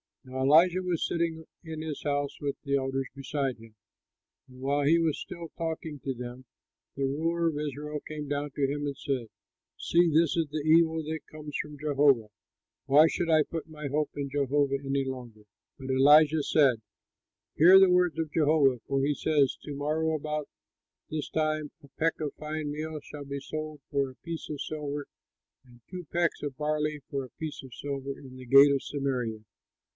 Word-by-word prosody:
Now 130 0 -7
Elisha 170 +6 +5
was 180 -3 -1
sitting 165 -1 -2 0.2
in 160 -2 -6
his 155 -2 -5
house 145 -1 -1
with 140 -1 -2
the 140 -2 0
elders 135 -1 -1
beside 135 -1 -2
him; 115 -1 -16 0.7
and 130 -1 -15
while 140 +1 +1
he 165 +4 +5
was 160 -3 0
still 170 -2 -7
talking 160 -2 -4
with 135 -3 -3
them, 125 +1 -7 0.5
the 140 - -2
ruler 165 +5 0
of 150 - -4
Israel 150 0 -4
came 150 -1 -6
down 145 0 -2
to 140 0 0
him 145 +1 -2
and 140 -1 -3
said, 135 -6 -2 0.5
"See, 170 0 +3
this 160 0 +3
is 165 -2 +1
the 150 +1 -3
evil 160 0 +4
that 160 +1 -3
comes 150 -1 -8
from 150 -1 -5
Jehovah! 140 -5 +3 0.6
Why 145 +3 +7
should 170 +1 -2
I 155 -1 +5
put 165 +1 -6
my 150 -2 -6
hope 150 +2 0
in 140 -1 -3
Jehovah 140 0 +1
any 135 0 0
longer?" 125 -5 -7 0.4
But 130 -1 -5
Elisha 150 +3 +6
said, 135 -8 +3 0.7
"Hear 180 +5 +8
the 190 -1 +6
word 180 -2 +3
of 160 -2 -2
Jehovah, 145 -5 +3
for 135 0 +1
he 145 +1 +2
says, 145 -3 +2
'To 145 - -6
morrow 155 +3 0
about 150 -1 -3 0.6
this 155 -1 -3
time 155 -1 -1
a - - -14
peck 165 +5 -1
of 150 -2 -3
fine 155 -1 -4
meal 155 +1 -4
shall 145 -1 -9
be 140 0 -4
sold 155 +1 -6
for 140 -1 +1
a - - -18
piece 165 -1 -6
of 150 -2 -4
silver 145 -2 -4 0.6
and 120 -2 -19
two 180 -1 -7
pecks 170 -1 0
of 140 -3 -4
barley 150 0 -1
for 140 -1 -2
a 130 - -10
piece 155 -2 -5
of 130 -2 -12
silver 140 0 -5
in 130 -2 -12
the 130 - -10
gate 140 +3 +8
of 140 -1 0
Samaria.'" 125 -6 -2
145 Hz, 185 wpm, -29 LUFS, 140-155 Hz, 0.7 s, Hear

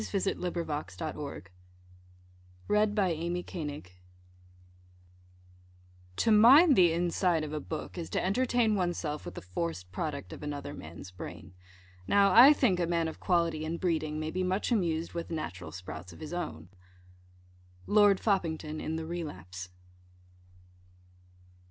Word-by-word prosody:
DETACHED 200 -2 -1 0.3
THOUGHTS 150 -1 -5
ON 160 -2 -3
BOOKS 140 -11 -8 1.2
AND 210 0 +2 0.5
READING 150 -4 -5 2.3
To 225 - +2
mind 265 +9 +8
the 175 -4 +6
inside 170 0 +1
of 155 0 -5
a 155 - -2
book 160 +3 -6
is 165 - -5
to - - -1
entertain 235 +2 +2
one's 180 -3 0
self 150 0 -4
with - - -7
the - - -8
forced 90 0 -4
product 140 - -4
of - - -10
another 145 -1 -5
man's 85 +3 -10
brain. 90 0 -9 0.5
Now 200 -1 +4
I 255 +5 +10
think 235 -11 +2
a 170 - +1
man 170 -1 +1
of 160 - -7
quality 170 -3 +1
and 165 +2 -3
breeding 155 -4 -1
may 155 0 -3
be 185 - -2
much 185 +6 -1
amused 170 -7 0
with 170 -1 -4
the 165 - -4
natural 90 - -6
sprouts 90 +1 -8
of 85 - -13
his 155 +2 -7
own. 80 - -5 1.2
_Lord 205 -2 +5
Foppington 160 -6 -1
in 160 - -3
the 160 0 -4
Relapse. 95 - -6
165 Hz, 140 wpm, -30 LUFS, 150-190 Hz, 2.3 s, I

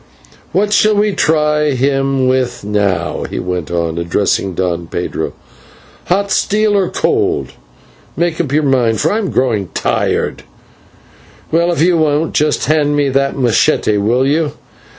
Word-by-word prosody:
"What 205 +2 +1
shall 215 0 +4
we 210 +1 +2
try 150 -3 +1
him 135 0 +1
with 130 -3 0
now?" 100 -4 -1
he - - -5
went 90 -3 -3
on, 85 -1 -2
addressing 95 +2 -1
Don 85 -2 -2
Pedro; 85 - -4 0.7
"hot 200 +2 0
steel 210 +2 +1
or 195 -3 +1
cold? - - 0 0.7
Make 170 0 0
up 145 -6 -4
your 155 +2 +2
mind, 125 -6 +1
for - - +1
I 215 - 0
am 200 - -2
growing 115 -7 0
tired. - - -1 1.1
Well, 170 +2 +2
if 165 - +1
you 175 0 +3
won't, 155 0 +1
just 150 0 +1
hand 150 -1 +1
me 145 -1 +1
that 135 +1 0
/machete/, 110 -4 +2
will 120 +5 +2
you? 150 +1 0
140 Hz, 150 wpm, -15 LUFS, 105-165 Hz, 1.1 s, shall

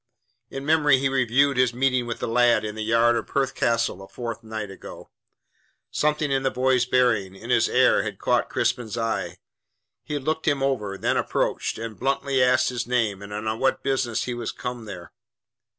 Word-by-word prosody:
In 135 0 -6
memory 150 -3 +4
he 135 +1 0
reviewed 135 +1 +2
his 125 -1 +2
meeting 130 -1 +1
with 115 - -3
the - - -4
lad 120 -2 +3
in 105 - -4
the 110 0 -5
yard 115 +2 +3
of - - -3
Perth 135 -1 0
Castle 115 -5 0
a 95 - -10
fortnight 110 -3 -6
ago. 95 - -11 0.8
Something 150 -1 0
in 135 0 +1
the 135 - +1
boy's 130 -1 +1
bearing, 115 -7 +2
in - - -7
his - - +3
air, - - +4
had - - -5
caught - - +1
Crispin's 115 -2 -1
eye. 115 -1 -2 0.7
He 150 - -5
had 145 - -4
looked 160 +2 -2
him 140 -3 +2
over, 105 -8 -1
then - - 0
approached, - - -1
and 115 -1 -7
bluntly 135 0 0
asked 130 0 +3
his 120 -2 -4
name 115 -6 0
and 100 +1 -9
on 110 +2 -3
what 135 0 +1
business 125 -4 0
he 125 - -3
was 120 -2 -4
come 125 -2 -6
there. 90 -5 -9
125 Hz, 190 wpm, -24 LUFS, 110-135 Hz, 0.8 s, memory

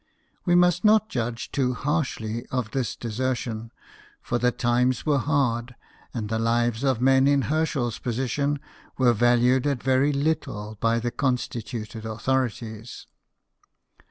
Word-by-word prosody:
We 175 -2 +4
must 175 0 +4
not 215 0 +4
judge 120 -1 -3
too 125 -3 0
harshly 130 -7 -2
of 125 -5 -3
this 130 -3 -2
desertion, 120 -1 -3 0.5
for 120 - -2
the 125 +1 +3
times 125 +1 +1
were 145 -3 +3
hard, 125 -4 0 0.4
and 110 -4 -4
the 110 +1 -1
lives 115 +1 +1
of 130 -4 +2
men 135 +1 +4
in 140 -1 +3
Herschel's 150 -6 -1
position 135 +4 -1 0.4
were 125 -2 +4
valued 120 +3 +3
at 140 -4 -1
very 130 +3 +3
little 140 -8 -2
by 115 0 +2
the 120 +1 -2
constituted 120 -4 -3
authorities. 115 -1 -3
125 Hz, 130 wpm, -25 LUFS, 115-140 Hz, 0.5 s, We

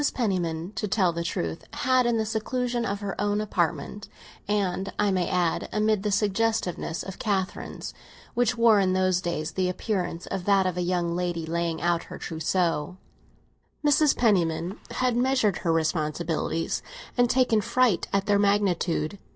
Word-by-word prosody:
Penniman, 180 -6 -1
to 210 - -1
tell 185 -3 +2
the 170 0 -3
truth, 85 - -3
had, 255 -1 +2
in 235 -1 +2
the 220 - 0
seclusion 240 +2 -1
of 200 0 -3
her 200 -1 -3
own 205 0 +1
apartment—and, 195 0 -2
I 205 -1 +2
may 180 -2 0
add, 175 -2 0
amid 215 -1 +1
the 210 - -1
suggestiveness 205 -4 0
of 190 - -8
Catherine's, 195 -3 -3 0.4
which 245 0 +1
wore 230 -3 +6
in 185 -1 +2
those 185 -1 +2
days 170 -3 -2
the 185 -1 0
appearance 180 -3 -2
of 190 -2 -4
that 195 -2 +4
of 185 -2 0
a 180 - -1
young 175 -1 0
lady 175 -2 -2
laying 165 0 -2
out 170 -1 +1
her - - -9
trousseau—Mrs. 180 - -1
Penniman 180 -4 +1
had 255 -2 0
measured 245 -6 +2
her 170 - 0
responsibilities, 160 0 -1 0.3
and 245 -1 +3
taken 245 -4 +3
fright 240 -3 +2
at 195 0 +1
their 205 -1 +3
magnitude. 200 -3 +1
190 Hz, 150 wpm, -26 LUFS, 170-215 Hz, 0.4 s, wore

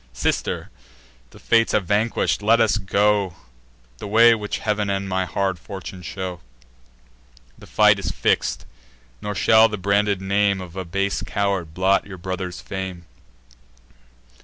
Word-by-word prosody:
"Sister, - - -2 0.6
the - - -17
Fates 115 -1 +2
have 100 - +1
vanquish'd: 105 +2 0
let 115 +3 +4
us 110 -2 +2
go 100 -1 +1 0.6
The - - -6
way 115 +3 +6
which 105 -2 -3
Heav'n 105 -1 -1
and 100 0 -2
my 95 0 -1
hard 95 -1 -2
fortune 95 0 -8
show. 90 0 -6 1.2
The - - -15
fight - - +4
is - - -3
fix'd; - - 0 0.6
nor 105 0 -4
shall 110 +3 +5
the 105 - -4
branded 100 0 +1
name 100 +1 +1
Of 90 -2 -9
a 95 -1 -4
base 100 +3 -1
coward 95 -5 -2
blot 95 +2 +2
your 95 -2 -9
brother's 90 0 -5
fame. 95 -3 -6
100 Hz, 140 wpm, -22 LUFS, 95-105 Hz, 1.2 s, way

